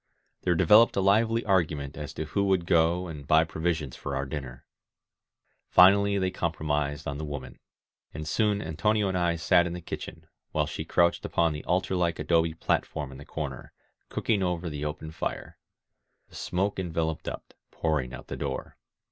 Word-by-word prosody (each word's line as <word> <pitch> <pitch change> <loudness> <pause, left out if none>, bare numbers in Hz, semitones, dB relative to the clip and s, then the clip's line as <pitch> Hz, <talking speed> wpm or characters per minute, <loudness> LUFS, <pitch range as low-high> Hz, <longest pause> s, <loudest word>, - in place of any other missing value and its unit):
There 90 -1 +1
developed 105 +7 +6
a - - +2
lively 110 +4 +3
argument 80 -7 0
as 75 -3 -6
to 80 - -3
who 100 +6 0
would 95 -3 +2
go 85 +2 +3
and 75 -5 -8
buy 80 +1 +5
provisions 80 -4 -2
for 70 - -5
our 70 0 -1
dinner. 65 -3 -7 1.0
Finally 100 +2 +6
they 95 -1 0
compro 85 -3 -3
mised 75 0 -1
on 70 0 -4
the - - -4
woman; 70 -4 -7 0.5
and 75 +1 -6
soon 105 +3 +1
Antonio 105 +6 +1
and 95 - -2
I 85 -1 +1
sat 85 +1 +3
in 85 - -4
the 90 - -5
kitchen, 85 - -7 0.3
while - - +2
she - - -5
crouched 85 -1 +2
upon 85 -2 +1
the 75 - -6
altar 95 +1 0
like 85 -2 +1
adobe 85 -1 +1
platform 75 -3 -1
in 65 - -10
the 70 - -10
corner, 70 -5 -6 0.4
cooking 105 -3 0
over 90 -2 -1
the 75 0 -5
open 75 +1 -5
fire. - - -5 0.7
The - - -16
smoke 95 +2 -1
enveloped 80 -3 -2
up, - - -6 0.2
pouring 75 -6 -1
out - - -9
the - - -6
door. 70 -2 -4
80 Hz, 180 wpm, -28 LUFS, 75-95 Hz, 1.0 s, developed